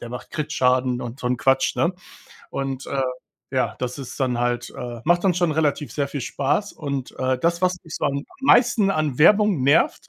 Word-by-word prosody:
der 120 - -7
macht 125 +1 -8
Krit-Schaden 125 -4 +1
und 120 +2 -7
so 125 - -3
'n 125 - +1
Quatsch, 135 +2 +2
ne? 170 +2 +2 0.6
Und, 135 -1 -4
äh, 140 - -2 0.5
ja, 130 -1 0
das 125 +2 -4
ist 130 +1 -8
dann 125 -2 0
halt, 120 0 -1
äh 120 -1 -6
macht 175 +2 +3
dann 185 -3 +3
schon 175 -3 +1
relativ 150 -5 0
sehr 140 -1 -1
viel 140 -1 -5
Spaß 145 - -1
und, 140 -4 -4
äh, 130 0 0
das, 170 +5 0
was 180 0 +2
mich 160 - -9
so - - -3
am 140 0 +1
am - - -8 0.2
meisten 240 -6 +5
an 155 -7 -1
Werbung 200 -2 +5
nervt, 145 +4 +2
140 Hz, 210 wpm, -23 LUFS, 125-165 Hz, 0.6 s, meisten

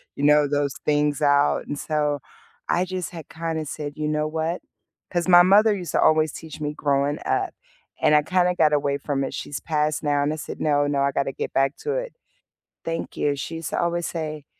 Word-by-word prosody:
you 140 - -5
know, 150 0 +5
those 145 -1 0
things 150 0 +1
out, 145 0 +3
and 145 - -4
so, 150 -2 0 0.5
I 180 - +2
just 185 -2 -4
had 165 -4 -9
kinda 160 -1 -3
said, 145 0 -5
"You 150 -1 -2
know 150 0 0
what" 160 +3 -2 0.5
'Cause 175 0 -1
my 175 -1 +9
mother 205 +4 +5
used 180 -5 -5
to - - +3
always 155 -1 +3
teach 160 -1 -9
me 150 -1 -3
growing 145 0 0
up, - - 0 0.5
and - - +4
I 150 - +6
kinda 180 +2 +2
got 155 -3 +3
away 140 -1 +1
from 140 -1 -2
it, 135 - -4
she's 135 -2 -5
passed 155 -1 -1
now. 145 -1 +1
And 145 +2 0
I - - -3
said, 155 - -7
"No, 145 -1 +2
no, 145 -1 0
I 140 0 +2
got - - +1
to 135 - -4
get - - -5
back 135 +1 +1
to 445 0 -3
it." - - -3 0.7
Thank 165 0 -4
you. 145 -1 +1
She 140 +4 -5
used 165 -1 -5
to - - 0
always 170 0 -1
say, 155 -3 -5
150 Hz, 220 wpm, -24 LUFS, 145-165 Hz, 0.7 s, my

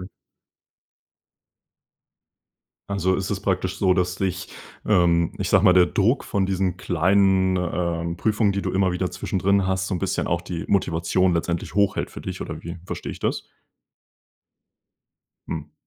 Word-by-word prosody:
Okay. 90 - -8 2.8
Also, 95 -2 +1
ist 95 0 -3
es 100 -2 -2
praktisch 95 -2 -1
so, 95 -2 +3
dass 90 0 0
dich, 95 -2 -3 0.4
ähm, 85 -4 +3
ich - - -2
sage - - +4
mal, 90 - +6
der 90 -1 +6
Druck 105 +9 +1
von 100 -2 0
diesen 95 -2 0
kleinen, 95 +2 +2
ähm, 85 -1 -2
Prüfungen, 105 0 +1
die 100 - -2
du 95 - -2
immer 95 0 +2
wieder 90 +1 -2
zwischendrin 100 -1 0
hast, 95 0 -1
so 95 - -2
'n - - -3
bisschen - - -1
auch 85 0 0
die 90 -2 -5
Motivation 90 -1 +1
letztendlich 85 +1 -2
hochhält 100 -1 +1
für - - -9
dich, - - -6
oder - - -6
wie 85 +1 -6
verstehe - - -5
ich - - -9
das? - - -1 2.0
Mhm. 75 -2 -5
95 Hz, 155 wpm, -23 LUFS, 85-95 Hz, 2.8 s, mal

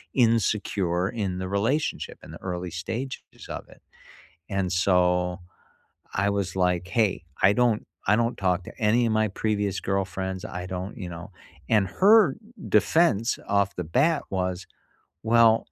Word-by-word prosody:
insecure 105 -6 +1
in 100 -6 -3
the 95 - -3
relationship, 115 +10 -1
in - - -11
the - - -11
early 90 -2 -4
stages 115 +10 -6
of - - -7
it. - - -18 0.7
And 95 -2 -1
so, 90 -1 +2 0.8
I 100 +1 +1
was 100 -2 -2
like, 90 -1 +1
"Hey, 105 -5 +1 0.2
I 95 - +6
don't 115 -1 +2 0.2
I 105 - +5
don't 115 +1 0
talk 90 -1 +1
to - - -12
any 115 +3 +3
of 115 - 0
my 110 0 +2
previous 100 -1 -1
girlfriends, 95 0 -2
I 90 -3 -6
don't 95 +4 -5
you 90 - -5
know," 90 +4 -9 0.4
and 105 -4 +3
her 200 - +5 0.3
defense 115 - +3
off 100 -1 +1
the 90 - -3
bat 140 - +2
was, 90 -1 -2 0.6
"Well, 115 0 +4
100 Hz, 150 wpm, -25 LUFS, 90-115 Hz, 0.8 s, I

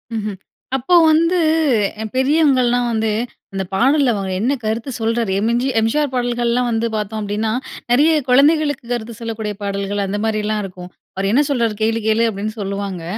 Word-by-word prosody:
மஹ்ம். 210 -3 -3 0.4
அப்போ 270 +8 +2 0.2
வந்து 335 +3 +3 0.6
எ - - -2
பெரியவங்கலாம் 260 -3 +3
வந்து, 220 -1 0 0.4
"அந்த 195 - -2
பாடல்ல 265 +4 +3
அவர் 190 -3 -3
என்ன 255 +6 +1
கருத்து 225 +5 -2
சொல்றார்," 225 -2 0
எம்ஜி 235 +4 +1
எம்ஜிஆர் 265 +6 +1
பாடல்கள்லாம் 245 0 0
வந்து 225 +1 0
பார்த்தோம் 215 +1 -3
அப்டின்னா, 210 +2 -2 0.4
நிறைய 295 +6 +5 0.2
குழந்தைகளுக்கு 290 +1 +3
கருத்து 235 0 -4
சொல்லக்கூடிய 220 -2 -4
பாடல்கள் 200 0 -2
அந்த 205 +2 -3
மாரிலாம் 215 -1 -1
இருக்கும். 180 -2 -9 0.3
"அவர் 195 +1 -1
என்ன 280 +6 +4
சொல்றார் 235 -5 0
கேளு 225 +1 +1
கேளு" 220 +1 +3
அப்டின்னு 215 +1 -4
சொல்லுவாங்க. 195 -3 -4
225 Hz, 150 wpm, -19 LUFS, 210-250 Hz, 0.6 s, நிறைய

